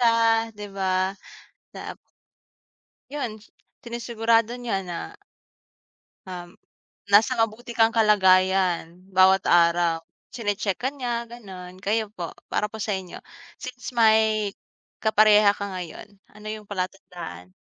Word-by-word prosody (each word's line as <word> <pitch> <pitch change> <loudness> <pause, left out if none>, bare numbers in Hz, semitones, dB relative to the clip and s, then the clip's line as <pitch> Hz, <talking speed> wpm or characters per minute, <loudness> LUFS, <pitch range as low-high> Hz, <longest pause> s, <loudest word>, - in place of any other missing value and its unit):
siya 230 -1 +3
di 205 0 -6
ba 190 0 0 0.6
na - - -7 1.2
Yun 230 -8 -5 0.4
sinisigurado 230 -1 +1
niya 230 -6 -3
na 175 - -6 1.1
um, 175 -1 -7 0.6
nasa 205 +5 +5
mabuti 225 +2 -1
kang 225 -1 +3
kalagayan 185 -5 +3
bawat 190 0 +5
araw. 170 -1 +3 0.3
Chine-check 205 -3 -2
ka 260 - -1
niya 240 -4 -3
ganon. 190 -6 -11
Kayo 210 +1 -1
po, 175 -5 -5 0.2
para 210 - +1
po - - -8
sa 210 0 -2
inyo, 190 -2 -6 0.4
since 250 -4 -7
may, 220 -2 +4 0.5
kapareha 215 -1 +6
ka 200 - -4
ngayon, 175 -3 -7 0.2
ano 210 +1 -14
yung 215 -1 -9
palatandaan? 180 - -6
210 Hz, 110 wpm, -25 LUFS, 185-225 Hz, 1.2 s, kapareha